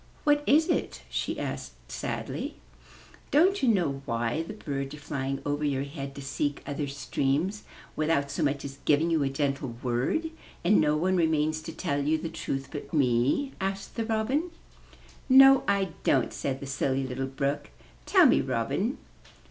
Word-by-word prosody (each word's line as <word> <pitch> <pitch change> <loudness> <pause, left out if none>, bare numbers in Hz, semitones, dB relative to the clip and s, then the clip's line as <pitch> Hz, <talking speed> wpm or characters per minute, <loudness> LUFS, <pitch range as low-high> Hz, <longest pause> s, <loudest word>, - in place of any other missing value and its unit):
''What 295 0 +4
is 315 +4 +5
it?" 340 - -1
she - - -2
asked - - -6
sadly. - - -4 0.8
''Don't 365 +6 +4
you 260 - +3
know 165 -10 +1
why 115 +5 0
the 190 +6 -7
birds 140 -6 -4
are - - -11
flying 135 -2 -3
over 145 +1 -1
your 140 -2 0
head 140 -1 -7
to 140 - -7
seek 145 +1 -2
other 145 0 -3
streams, 140 +8 -1 0.3
without 150 -2 +1
so 145 - -3
much 140 -2 0
as 135 0 -8
giving 155 +3 +3
you 160 -2 +2
a 140 - +1
gentle 135 -3 -2
word, 130 - 0 0.3
and 205 +4 +5
no 150 0 +2
one 185 +4 +1
remains 155 -2 +1
to 165 - -7
tell 155 -3 -2
you 155 +2 +2
the 165 +1 -4
truth 135 -4 -4
but 145 -2 -7
me?'* 135 - +2
asked 195 +1 -3
the 230 - -1
Robin. 235 +10 0 0.8
''No, 270 +1 +8
I 200 -1 +2
don't," 130 -4 +2
said 135 -1 -3
the - - -5
Silly 135 0 -1
Little 130 +1 -3
Brook. 140 +2 -2 0.4
"Tell - - +6
me, - - +5
Robin." 195 - -1
145 Hz, 170 wpm, -28 LUFS, 135-190 Hz, 0.8 s, No